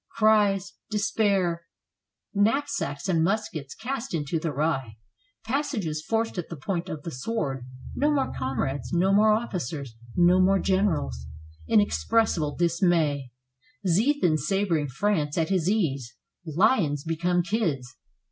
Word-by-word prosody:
Cries, 210 -3 +3 0.2
despair; 195 -5 0 0.7
knapsacks 220 - 0
and 165 -4 +2
muskets 170 -8 -2
cast 250 -2 -4
into 155 +1 -1
the 160 0 -2
rye; 135 -6 -1 0.5
passages 225 - -2
forced 225 -2 -1
at 175 - -5
the 170 - -5
point 170 +4 -3
of 150 -2 -6
the 165 - -5
sword; 135 - -3 0.3
no 295 - +1
more 280 -2 0
comrades, 130 -1 -2
no 185 +3 +3
more 215 +2 +5
officers, 160 - -2 0.2
no 180 +1 +5
more 195 +1 +4
generals; 165 - 0 0.4
inexpres 220 +2 +3
sible 150 -4 -2
dismay. 165 -6 +1 0.6
Ziethen 195 - +3
sabering 165 -2 0
France 155 -1 0
at 160 -1 +1
his 185 -3 +1
ease. 140 - -1 0.3
Lions 160 - +2
become 175 +2 0
kids. 165 - -2
175 Hz, 125 wpm, -26 LUFS, 145-210 Hz, 0.7 s, more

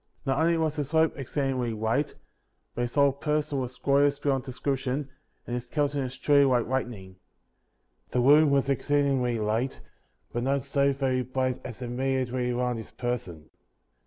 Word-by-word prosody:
32. - - -2
Not 135 - +1
only 170 0 +3
was 160 -2 0
his 145 +2 -3
robe 160 0 +4
exceedingly 135 -3 -2
white, 110 +7 -1 0.6
but - - -3
his 120 +2 -3
whole 140 -1 +5
person 150 0 -1
was 125 -1 -5
glorious 140 +1 +3
beyond 140 -2 0
description, 135 +1 -2 0.4
and 120 - -5
his 120 0 -3
countenance 140 -2 -1
truly 145 0 +4
like 125 -4 +3
lightning. 115 -8 -4 0.9
The 125 - 0
room 145 +4 +6
was 140 -1 +2
exceedingly 135 -3 +1
light, 110 +5 -1 0.5
but 120 - -1
not 135 +1 0
so 140 0 +2
very 130 -2 0
bright 130 0 -2
as 125 0 -7
immediately 125 0 -1
around 125 0 0
his 110 - -8
person. 95 -11 -5
130 Hz, 160 wpm, -27 LUFS, 125-140 Hz, 0.9 s, room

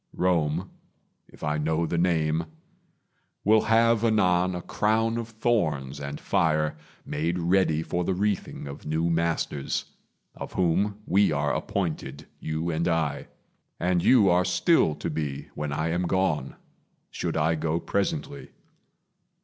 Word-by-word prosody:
Rome, 85 0 0 0.6
if - - -16
I 75 0 0
know 80 +2 0
the 85 +1 -1
name, 80 -2 +1 1.0
Will 110 +1 +5
have 115 0 +4
anon 90 -5 +2
a 90 - -5
crown 110 +7 +1
of 115 -1 -5
thorns 80 - -1
and 70 0 -5
fire 75 -2 +1 0.3
Made 80 +4 -1
ready 85 -2 +2
for 90 +2 -2
the 95 +1 0
wreathing 100 -4 -2
of 70 +1 -8
new 80 +2 0
masters, 80 -4 -1 0.5
Of - - -8
whom 100 +4 0
we 100 -1 +3
are 75 -2 0
appointed, 75 -6 -3
you 80 +2 -2
and 80 +1 -1
I, 80 -4 -1 0.5
And 90 0 +1
you 115 -6 +6
are 90 0 +4
still 90 - +3
to - - -4
be 75 -3 -4
when 75 -1 -4
I 80 +3 -1
am 85 +2 0
gone, 90 -8 0 0.6
Should - - -3
I 80 +1 +2
go 80 +1 -1
presently. 140 - -2
85 Hz, 140 wpm, -26 LUFS, 75-95 Hz, 1.0 s, you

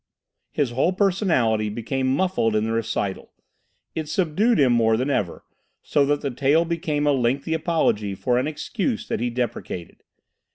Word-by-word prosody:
His 140 -5 -1
whole 135 +9 +1
personality 170 - +1
became 130 +5 -2
muffled 135 - +1
in 105 - +2
the 110 - -1
recital. 115 -4 -2 0.6
It 155 -2 -4
subdued 190 +8 +2
him 130 -4 +4
more 115 -1 +3
than 130 +4 -1
ever, 95 -10 -2 0.4
so 140 -1 +2
that 145 0 +1
the 140 - -2
tale 140 +6 +2
became 160 -3 -1
a 145 - +4
lengthy 135 +4 0
apology 155 - 0
for 125 +4 +1
an 130 - -1
experience 215 - -3
that - - -1
he 120 +1 0
deprecated. 120 -7 -4
135 Hz, 160 wpm, -23 LUFS, 115-160 Hz, 0.6 s, him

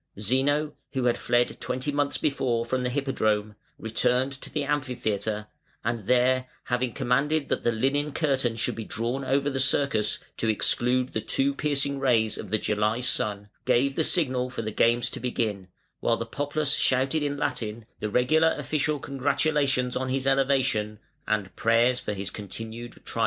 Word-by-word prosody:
Zeno, 140 +7 +1 0.2
who 130 -2 -1
had 120 -1 +3
fled 120 0 +1
twenty 130 +3 -2
months 145 0 0
before 125 -5 0
from 130 +2 -1
the 125 - 0
Hippodrome, 110 -6 0 0.2
returned 125 +4 +1
to - - -3
the 150 - -1
Amphitheatre, 110 -7 -2 0.4
and 115 -2 -2
there, 125 +2 +3 0.2
having 125 0 -1
commanded 140 +5 +1
that - - -1
the 120 - +3
linen 135 +6 0
curtain 135 -6 0
should 115 - -1
be 115 - -5
drawn 120 +6 -2
over 135 +2 +1
the 135 -2 -1
circus 130 -5 +2 0.2
to 115 - -1
exclude 125 +4 +1
the 110 - -1
too 135 +5 +1
piercing 140 -1 0
rays 115 -5 +2
of 105 - -7
the 110 - +2
July 105 +2 0
sun, 105 -4 -1 0.2
gave 135 +3 +2
the 160 - +2
signal 130 -7 +2
for 120 -2 -5
the 110 - -3
games 120 +3 +2
to 135 - -5
begin, 110 -6 -2 0.3
while 115 - +1
the 115 - -3
populace 145 +4 0
shouted 135 +4 +2
in 145 -1 -1
Latin 115 -6 -2
the 105 - -2
regular 155 +8 +3
official 150 0 0
congratulations 140 -1 0
on 130 0 -1
his 135 0 -1
elevation 135 -6 +2 0.3
and 105 -3 -1
prayers 120 +2 +3
for - - -3
his 100 -1 -4
continued 115 +3 -7
triumph. - - -5
125 Hz, 170 wpm, -26 LUFS, 115-140 Hz, 0.4 s, had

